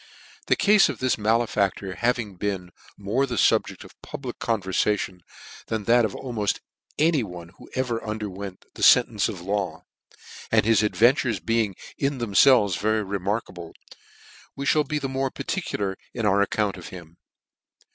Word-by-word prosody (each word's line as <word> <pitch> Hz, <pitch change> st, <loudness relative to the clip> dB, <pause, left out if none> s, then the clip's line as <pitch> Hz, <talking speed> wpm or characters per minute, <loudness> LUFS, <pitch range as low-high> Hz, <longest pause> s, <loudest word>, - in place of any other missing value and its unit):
TH -, -, +4 dB
E -, -, +2 dB
cafe 210 Hz, 0 st, +5 dB
of -, -, -14 dB
this 130 Hz, -1 st, +1 dB
malefaflor 105 Hz, -3 st, 0 dB
having 120 Hz, -4 st, 0 dB
been 90 Hz, -2 st, -3 dB, 0.3 s
more 110 Hz, +7 st, 0 dB
the 125 Hz, -, -3 dB
fubject -, -, +2 dB
of -, -, -17 dB
public 130 Hz, -3 st, -7 dB
converfation 100 Hz, -3 st, -1 dB, 0.5 s
than 110 Hz, -2 st, -2 dB
that 120 Hz, +2 st, +4 dB
of 105 Hz, -, -4 dB
aimed 115 Hz, -6 st, -2 dB, 0.4 s
any 155 Hz, -2 st, +3 dB
one 90 Hz, -5 st, -8 dB
who -, -, -14 dB
ever 125 Hz, -3 st, -1 dB
underwent 100 Hz, -3 st, -6 dB
the -, -, -11 dB
fentence -, -, +5 dB
of -, -, -5 dB
ths -, -, -10 dB
law, 100 Hz, -4 st, -2 dB, 0.7 s
and -, -, +4 dB
his 110 Hz, -2 st, +4 dB
adventures 115 Hz, +1 st, +2 dB
being 115 Hz, -3 st, 0 dB, 0.2 s
in 140 Hz, 0 st, 0 dB
themfelves 110 Hz, -3 st, +4 dB
very 110 Hz, +1 st, +1 dB
remarkable, 95 Hz, -3 st, -4 dB, 0.8 s
we 140 Hz, -, -5 dB
mail 150 Hz, -, +3 dB
be 150 Hz, +1 st, -3 dB
the 140 Hz, -, -2 dB
more 135 Hz, 0 st, -1 dB
particular 125 Hz, -, -3 dB, 0.2 s
in 115 Hz, -, -2 dB
our 100 Hz, 0 st, +3 dB
account 100 Hz, 0 st, 0 dB
of 90 Hz, -, -9 dB
him. 85 Hz, -2 st, -11 dB
105 Hz, 155 wpm, -24 LUFS, 100-125 Hz, 0.8 s, cafe